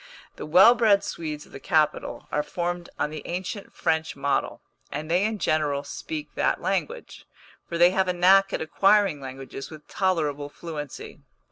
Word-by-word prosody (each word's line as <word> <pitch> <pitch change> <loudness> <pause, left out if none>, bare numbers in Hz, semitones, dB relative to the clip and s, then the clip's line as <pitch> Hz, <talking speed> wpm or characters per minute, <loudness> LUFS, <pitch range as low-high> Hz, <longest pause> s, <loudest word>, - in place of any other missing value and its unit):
The - - -7
well 190 +9 +8
bred 220 -4 +3
Swedes 150 -3 -5
of - - -21
the - - -9
capital 155 -1 0
are 150 - +1
formed 175 +2 -4
on 150 - -1
the 155 -1 -6
ancient 185 +3 -5
French 160 0 -1
model, 140 0 -1 0.3
and 155 +2 -5
they 180 +3 +3
in 215 +1 0
general 150 -6 0
speak 300 - -6
that - - +1
language; 485 0 -3 0.4
for 170 - -3
they 175 +1 +6
have 190 0 +1
a 180 - +1
knack 195 +2 +5
at - - -2
acquiring 195 0 +3
languages 135 0 -8
with 155 -1 -12
tolerable 150 -7 -1
fluency. 150 -2 -8
170 Hz, 165 wpm, -25 LUFS, 150-190 Hz, 0.4 s, well